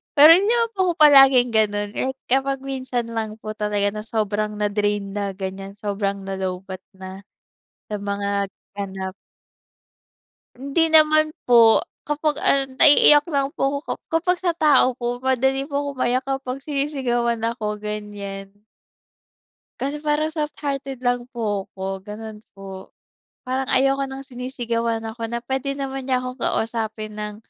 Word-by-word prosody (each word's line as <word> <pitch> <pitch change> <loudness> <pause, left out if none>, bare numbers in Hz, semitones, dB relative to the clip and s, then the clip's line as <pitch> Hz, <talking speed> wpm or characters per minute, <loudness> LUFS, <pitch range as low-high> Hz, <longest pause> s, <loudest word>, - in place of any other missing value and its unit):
pero 300 +3 +9
hindi 400 +5 +2 0.2
po 375 -2 +2
ako - - -3
palaging 270 -4 +7
gano'n 205 -1 +1
eh 265 - 0 0.2
kapag 270 +1 +1
minsan 260 -3 -3
lang 220 -1 -3
po 215 - -5
talaga 210 -1 0
na 210 - -5
sobrang 215 -1 -1
na-drain 205 -1 -1
na, 200 -1 -2
ganiyan, 195 +1 -6
sobrang 200 -1 -2
na-lowbat 190 -1 -5
na 190 +1 -9 0.7
sa 210 - -2
mga 200 0 -2 0.3
ganap. 190 -2 -5 1.4
Hindi 280 +5 0
naman 310 0 +5 0.2
po, 230 -2 +7 0.3
kapag 295 0 -1
ano, 270 -1 +2
naiiyak 295 0 +7
lang 280 -2 0
po 275 +1 0
ako - - -2 0.2
kapag 355 +2 +1
sa 350 -2 +1
tao 270 -5 +4
po, 245 0 -3
madali 265 +1 +1
po 280 - -5
ako - - -2
maiyak 255 +2 +1
kapag 270 -1 -3
sinisigawan 260 -5 -1
ako, 215 -2 -2
ganiyan. 205 -2 -6 1.3
Kasi 290 +2 -3
parang 300 0 +1
softhearted 285 -4 -4
lang 245 -1 0
po 210 -5 -2
ako, 190 0 -5
gano'n 215 +1 -9
po. 195 -1 -10 0.5
Parang 260 +1 -2
ayoko 275 +1 +3
ng 270 +1 -8
sinisigawan 235 -3 -3
ako, 225 0 -5
na 235 - -2
pwede 270 +1 -2
naman 270 -1 -5
niya 255 - +3
akong 255 0 -6
kausapin 220 -1 -2
ng 210 0 -5
240 Hz, 140 wpm, -22 LUFS, 205-275 Hz, 1.4 s, pero